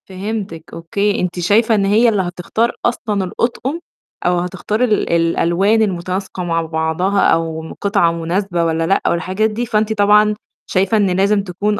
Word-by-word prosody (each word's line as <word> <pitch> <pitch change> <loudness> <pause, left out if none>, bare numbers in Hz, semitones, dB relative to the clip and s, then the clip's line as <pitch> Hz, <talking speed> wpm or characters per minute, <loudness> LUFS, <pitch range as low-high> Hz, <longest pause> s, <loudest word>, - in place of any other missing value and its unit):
فهمتِك 195 -3 -5
أوكي، 200 +5 -1
أنتِ 180 0 -2
شايفة 220 +6 +3
إن 200 -2 +1
هي 220 +4 +4
اللي 210 -3 +1
هتختار 180 +6 -1
أصلًا 215 -4 -1
الأطقم 245 - -2 0.5
أو 175 0 +2
هتختاري 190 +6 -1
ال 215 -4 0
الألوان 170 +5 +2
المُتناسقة 185 -1 -2
مع 165 -1 0
بعضها 160 +4 -1
أو 160 -1 0
قطعة 200 -4 +2
مناسبة 170 +2 -1
والّا 165 0 0
لأ 195 - +2
والحاجات 185 +5 0
دي، 225 +3 -3
فأنتِ 220 -1 0
طبعًا 210 0 +4 0.3
شايفة 195 +4 +2
إن 205 -2 +2
لازم 195 +2 +2
تكون 205 +3 -2
195 Hz, 155 wpm, -17 LUFS, 170-210 Hz, 0.5 s, هي